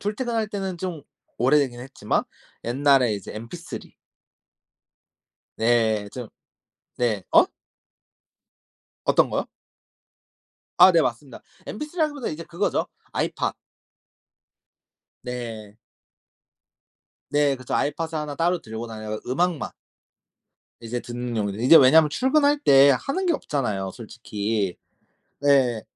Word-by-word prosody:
출퇴근할 220 +1 -2
때는 195 -4 -4
좀 170 -5 -5 0.4
오래되긴 130 -1 +2
했지만 125 -5 -2 0.4
옛날에 130 -2 +3
이제 100 - -7
MP3 115 +11 -8 1.7
네. 110 -2 +2
좀 120 -2 -7 0.7
네. 110 -5 0
어? - - +6 1.6
어떤 - - +3
거요? - - -2 1.3
아. 185 - +9
네. 165 -2 +4
맞습니다. 125 +1 -4 0.2
MP3라기보다 300 - -3
이제 165 +2 -7
그거죠 180 +5 -1 0.3
아이팟. - - -1 1.7
네. 115 -4 -7 1.5
네. 145 -2 +2
그쵸. 130 -1 -5
아이팟을 160 +3 -1
1 150 -2 -3
따로 175 +3 +1
들고 110 0 -6
다녀가 110 -1 -6
음악만 170 +4 0 1.1
이제 120 +1 -4
듣는 120 -1 -5
용도 100 -2 -1
이제 130 +8 +7
왜냐면 150 +4 +7
출근할 285 - +2
때 140 - +6
하는 370 +7 -1
게 345 - +3
없잖아요, 105 - -2
솔직히. 105 -3 -3 0.6
네. 130 -6 +3
135 Hz, 215 characters per minute, -24 LUFS, 115-170 Hz, 1.7 s, 아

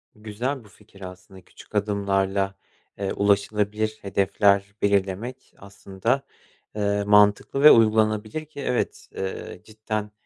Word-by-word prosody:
Güzel 115 +5 -4
bu 105 - -18
fikir 100 -1 -20
aslında, 90 0 -11
küçük 90 - -17
adımlarla, 100 -1 0 0.4
eee, 100 -1 -2
ulaşılabilir 105 +1 0
hedefler 100 0 +1
belirlemek 100 +6 -1
aslında, 100 +6 -3 0.5
eee, 100 -1 0
mantıklı 105 +6 +3
ve 150 - +11
uygulanabilir 110 +4 +2
ki 155 -1 -13
evet, 125 - -2
eee, 95 -1 -6
cidden, 110 -1 -5
105 Hz, 110 wpm, -24 LUFS, 100-110 Hz, 0.5 s, ve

